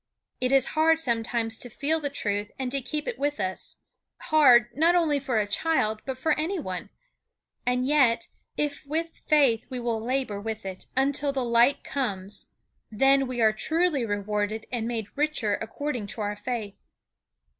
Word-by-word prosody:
It 255 0 0
is 270 -1 +5
hard, 320 +1 +4
sometimes, 230 -5 -1
to 245 - -4
feel 290 +7 0
the 290 -2 -2
truth 205 -6 -2
and 260 -2 -3
to 275 0 -1
keep 300 +4 -4
it - - -4
with 290 -3 -1
us; 185 -1 -2 0.4
hard, 245 -6 +5
not 330 +5 +4
only 315 -5 +3
for 255 -5 0
a 210 - +1
child, 215 -2 0
but 265 -1 -3
for 310 +5 0
any 350 +6 -1
one; 185 - -5 0.8
and 250 0 +2
yet, 280 +1 +3 0.3
if 295 -1 -2
with 325 +3 -3
faith 275 -8 +3
we 255 - -4
will 230 -2 -2
labor 250 -5 -1
with 220 -1 -5
it 190 -1 -7
until 280 +1 +2
the 265 -2 -1
light 235 +3 +3
comes, 200 -8 -3 0.4
then 270 +4 +3
we 250 -1 -3
are 220 -1 +5
truly 315 +4 +1
rewarded 210 0 -2
and 235 -2 -2
made 230 -3 -2
richer 290 -8 0
according 250 -2 -4
to 215 - -7
our 205 0 -2
faith. 210 -1 -4
250 Hz, 170 wpm, -26 LUFS, 220-290 Hz, 0.8 s, is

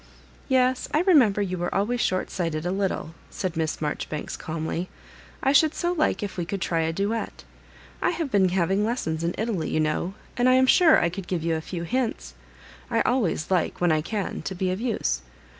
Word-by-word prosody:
" - - -27
Yes, 255 -1 +2
I 310 - +4
remember 255 - +4
you 185 -2 -3
were 175 - -2
always 235 +5 +1
shortsight 180 -3 -1
ed 155 +2 -3
a 175 - 0
little," 190 -4 -2 0.2
said 185 -4 -4
Miss 160 -1 -1
Maijoribanks, 150 0 -4
calmly. 165 +2 -4 0.3
" - - -22
I 270 - +4
should 310 +2 +4
so 345 - 0
like 310 -9 +1
if 200 - -5
we 175 - -1
could 195 +3 -3
try 170 -2 0
a 160 0 +1
duet. 200 +6 -3 0.6
I - - +3
have 330 -5 -2
been 190 -4 +4
having 190 +2 +1
lessons 170 -9 -1
in 170 +1 -1
Italy, 215 -6 -1
you - - 0
know, 155 +5 -1 0.2
and 245 +1 +3
I - - +6
am 260 0 +5
sure 320 +4 +6
I 170 - +2
could 180 +1 -7
give 175 -4 -2
you 165 0 +1
a 160 - -1
few 170 +1 -5
hints. 245 +5 -2 0.6
I 230 -2 +2
always 205 - 0
like, 180 -3 +1
when 175 -1 +3
I 155 -1 +2
can, 205 +4 -3
to 190 - -5
be 185 +1 0
of 185 +4 -3
use. 215 - -1
190 Hz, 215 wpm, -25 LUFS, 170-240 Hz, 0.6 s, I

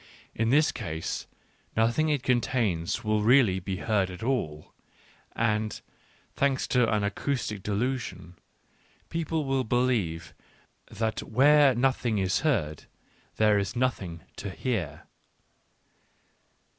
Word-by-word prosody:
In 115 +1 0
this 150 +5 +4
case 80 -9 -4 0.5
nothing 120 +8 +2
it 145 -4 0
contains 115 -9 0
will 110 0 +1
really 115 -4 +4
be 95 +1 -4
heard 100 -1 0
at 90 +3 -8
all, 80 - -2 0.6
and, 110 -1 0 0.5
thanks 140 -1 +1
to 125 -3 +3
an 105 -1 +1
acoustic 110 0 -2
delusion, 105 -4 -3 0.8
people 160 -2 -1
will 135 -1 +1
believe 110 -10 0 0.6
that 110 0 -2
where 140 +2 +5
nothing 125 -3 +1
is 95 0 +1
heard 90 - -1 0.5
there 105 -1 +4
is 100 +3 -3
nothing 100 -10 -1 0.2
to 100 - -5
hear. 95 - -3
110 Hz, 110 wpm, -27 LUFS, 95-130 Hz, 0.8 s, where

